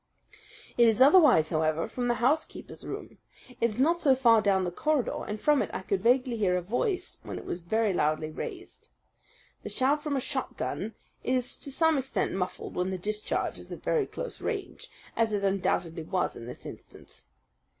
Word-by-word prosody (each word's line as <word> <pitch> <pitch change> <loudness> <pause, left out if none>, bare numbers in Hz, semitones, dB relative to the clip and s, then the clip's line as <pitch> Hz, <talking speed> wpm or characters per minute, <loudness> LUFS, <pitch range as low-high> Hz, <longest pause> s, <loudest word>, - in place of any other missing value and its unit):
"It 235 - +7
is 220 -2 +3
otherwise, 270 - +6
however, 155 0 +1
from 245 -1 -3
the 240 - +2
housekeeper's 270 +7 -1
room. - - -7 0.4
It 235 - +3
is 215 - -7
not 330 +6 +3
so 280 -6 +4
far 230 -4 +5
down 195 -2 +2
the 180 - -2
corridor, 300 - 0
and 210 +1 -4
from 295 +2 +3
it - - -2
I - - -4
could 190 0 -1
vaguely 250 +1 +3
hear 185 -4 +2
a - - -1
voice 360 - -1
when - - -6
it - - -8
was 175 - -4
very 210 +4 0
loudly 155 -1 0
raised. - - -8 0.7
The - - -6
sound 280 +3 +1
from 295 -2 -2
a - - +1
shotgun 225 -5 -4 0.3
is 250 -1 0
to - - -8
some 320 +1 +3
extent 265 0 -1
muffled 180 -1 -4
when 180 +1 -1
the 190 - -2
discharge 210 +3 -2
is - - -12
at - - -8
very 445 -5 +1
close - - -6
range, 410 -4 -4 0.3
as 225 -2 +1
it 200 -1 0
undoubtedly 180 -4 0
was 180 +3 -1
in 115 - -9
this 125 - -9
instance. - - -12
225 Hz, 190 wpm, -28 LUFS, 185-270 Hz, 0.7 s, It